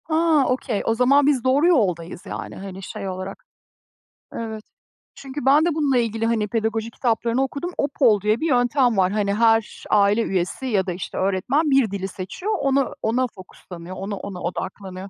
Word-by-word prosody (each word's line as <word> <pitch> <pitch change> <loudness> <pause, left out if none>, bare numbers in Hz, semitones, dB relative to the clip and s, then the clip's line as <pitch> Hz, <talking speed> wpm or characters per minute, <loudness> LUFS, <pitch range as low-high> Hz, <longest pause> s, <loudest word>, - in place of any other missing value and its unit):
Ha, 315 -3 +3
okey. 250 -4 -1
O 225 - +1
zaman 270 +4 +4
biz 275 -5 +2
doğru 270 +5 +3
yoldayız 185 - 0
yani, - - -6
hani, 195 0 -8
şey, 195 - -6
olarak. 185 +1 -7 0.9
Evet. 220 -2 -5 0.5
Çünkü 275 0 -7
ben 290 +4 +5
de 340 -3 0
bununla 285 -5 +2
ilgili 225 -1 0
hani 225 -2 +1
pedagoji 225 +1 -2
kitaplarını 235 +1 0
okudum. 280 +6 -4
OPOL 250 -7 +2
diye 210 +3 +1
bir 325 - +1
yöntem 245 -2 +2
var. 185 -1 +3
Hani, 205 -1 0
her 225 0 +2
aile 205 +2 +4
üyesi 185 +7 -2
ya 200 -6 +1
da 180 - -1
işte 180 - -6
öğretmen 225 - +1
bir 270 -6 +3
dili 195 -1 -3
seçiyor, 195 - -5
onu 275 -1 +1
ona 245 +3 +1
focuslanıyor, 185 -3 -11
ona 195 +2 -4
ona 190 -2 -7
odaklanıyor. 190 +2 -5
225 Hz, 170 wpm, -22 LUFS, 195-270 Hz, 0.9 s, ben